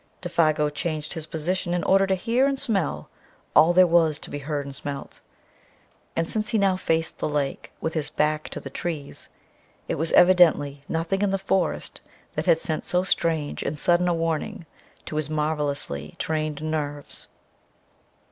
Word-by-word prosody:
Défago 155 -4 +1
changed 155 0 -3
his 160 -2 -6
position 175 +2 -2
in 175 - -1
order 195 0 +4
to 190 - +2
hear 235 +8 +2
and 275 -1 0
smell 190 - -1 0.5
all 160 +3 +7
there 185 +1 +7
was 165 -3 +3
to - - -10
be 145 - -4
heard 145 0 -3
and 140 -1 -8
smelt. 140 -1 -7 0.9
And, 165 0 0
since 215 +2 -1
he 220 - +1
now 195 -2 +3
faced 165 -3 -1
the - - -1
lake 145 -2 -2
with 160 - -2
his 155 -3 -1
back 155 0 0
to - - -6
the - - -9
trees 155 -5 -4 0.6
it - - -2
was 160 +1 +1
evidently 160 -6 +5
nothing 165 +4 -1
in 205 - +2
the 195 - +1
forest 190 -3 -1 0.3
that 155 +4 -3
had 170 -2 +6
sent 160 -1 -2
so 180 0 +1
strange 165 -5 0
and 150 - -3
sudden 175 +3 +3
a 175 - +3
warning 165 0 -2 0.4
to 155 - -4
his 155 -1 -1
marvelously 150 - -2
trained 155 -1 -2
nerves. 145 -2 -4
160 Hz, 170 wpm, -25 LUFS, 150-180 Hz, 0.9 s, all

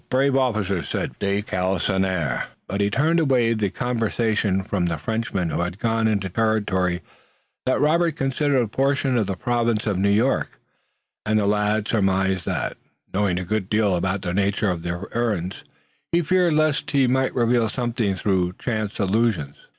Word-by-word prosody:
Brave 135 +1 +2
officers!" 105 - 0
said - - -2
de 100 +1 0
Galisonnière. 95 -6 0 0.2
But 100 +1 -2
he 100 - +2
turned 160 +9 +2
away 125 -7 +3
the 105 -3 0
conversation 110 -4 0
from 95 -2 -1
the 85 -1 -1
Frenchmen 100 -1 -2
who - - -1
had 85 +1 -3
gone 115 0 +1
down 110 - +2
into 100 -2 -1
territory 95 -4 0 0.6
that 130 - +2
Robert 165 +2 +2
considered 135 0 +1
a - - -3
portion 135 +3 +1
of 110 -5 +1
the 95 - -2
Province 115 0 0
of 100 -4 0
New 100 +1 +2
York, 115 +7 +1 0.6
and 110 0 +1
the 105 - +2
lad 105 +1 +1
surmised 95 -3 +1
that, - - -2 0.4
knowing 100 -2 +1
a 90 - -3
good 105 0 -2
deal 105 -3 +2
about 95 +2 -1
the 90 -2 -2
nature 100 +1 +1
of 85 -2 -4
their 85 +2 -4
errands, 105 -6 -1 0.5
he 170 +1 +2
feared 180 -1 +2
lest 150 -1 +1
he 140 -2 +3
might 130 +1 +1
reveal 120 -2 +2
something 120 -4 -1
through 95 -2 0
chance 110 -1 -3
allusions. 100 -8 +1
105 Hz, 170 wpm, -23 LUFS, 95-120 Hz, 0.6 s, away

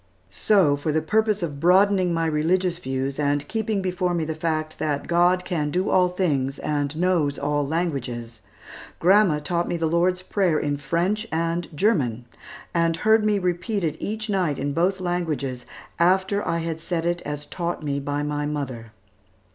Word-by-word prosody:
So 185 -9 +3
for 145 +2 -2
the 155 - +2
purpose 215 +2 +1
of 145 -4 -4
broadening 185 +2 +4
my 165 -1 0
religious 170 +3 +1
views, 135 -1 -3
and 145 0 0
keeping 220 -3 -1
before 180 -1 -1
me 165 -2 -1
the 160 - -2
fact 155 -1 -2
that 145 -2 -1
"God 175 +1 +3
can 160 -5 -1
do 180 +5 0
all 180 -1 +4
things 140 -7 -1
and 145 0 -2
knows 165 -5 +1
all 145 0 -1
languages," 125 -8 -3 0.6
grandma 190 -2 +4
taught 170 +3 -1
me 175 - -1
the 165 - -1
Lord's 180 +3 +1
Prayer 185 -4 +1
in 145 -1 -1
French 180 +9 -1
and 165 +1 -1
German, 130 - +1 0.5
and 165 -1 +1
heard 220 +4 +4
me 210 -1 +2
repeat 180 +2 -1
it 155 -2 0
each 215 +1 -3
night 185 -8 0
in 140 +1 -2
both 185 +4 +1
languages, 155 -9 -2 0.3
after 190 +3 +2
I 170 - +1
had 165 -1 -4
said 165 -1 -2
it 175 0 0
as 145 0 -5
taught 170 0 -4
me 140 -1 -1
by 145 +1 -2
my 145 0 -2
mother. 130 -7 -5
165 Hz, 170 wpm, -24 LUFS, 145-185 Hz, 0.6 s, broadening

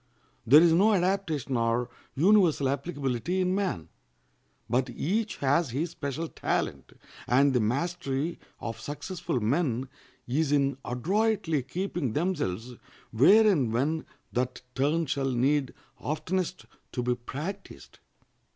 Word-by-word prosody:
There 150 +7 +8
is 170 -2 +5
no 205 +6 +5
adaptation 175 -8 0
or 115 +1 +1 0.3
universal 175 -4 +4
applicability 140 +2 -2
in 185 0 +1
man; 185 - -2 0.8
but 125 +1 +1
each 205 - -1
has 145 +3 +2
his 150 +8 -2
special 140 +4 -4
talent, - - -3 0.3
and 135 +2 +4
the 125 - +3
mastery 140 +5 -1 0.2
of 115 -1 -5
successful 145 - -3
men 130 +1 0 0.4
is 145 +4 0
in 140 -2 +2
adroitly 175 - 0
keeping 165 - -3
themselves 145 - -2 0.4
where 195 - +6
and 145 - +2
when 145 +7 0 0.3
that 125 +1 -2
turn 150 +5 +1
shall 135 -1 -1
need 135 +2 +1 0.3
oftenest 180 +4 -2 0.3
to 125 - -2
be 125 0 +1
practiced. 150 +11 -7
145 Hz, 120 wpm, -28 LUFS, 125-175 Hz, 0.8 s, There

